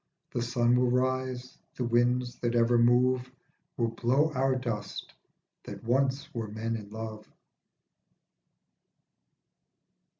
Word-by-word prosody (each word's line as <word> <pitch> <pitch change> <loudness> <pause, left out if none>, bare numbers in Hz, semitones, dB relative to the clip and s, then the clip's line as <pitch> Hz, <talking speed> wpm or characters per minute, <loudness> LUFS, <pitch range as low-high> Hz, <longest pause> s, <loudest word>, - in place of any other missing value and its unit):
The 120 - -2
sun 120 0 +2
will 125 0 +3
rise, 130 0 -1 0.2
the 125 - -2
winds 120 +1 +1
that 120 0 -1
ever 120 0 +4
move 125 +1 +3 0.5
Will 115 -1 +1
blow 130 +7 +1
our 130 0 +2
dust 120 -5 -4 0.5
that - - -8
once 135 +3 0
were 115 -2 -3
men 110 +2 -3
in 105 -2 -7
love. 110 0 -7
120 Hz, 110 wpm, -29 LUFS, 115-130 Hz, 0.5 s, ever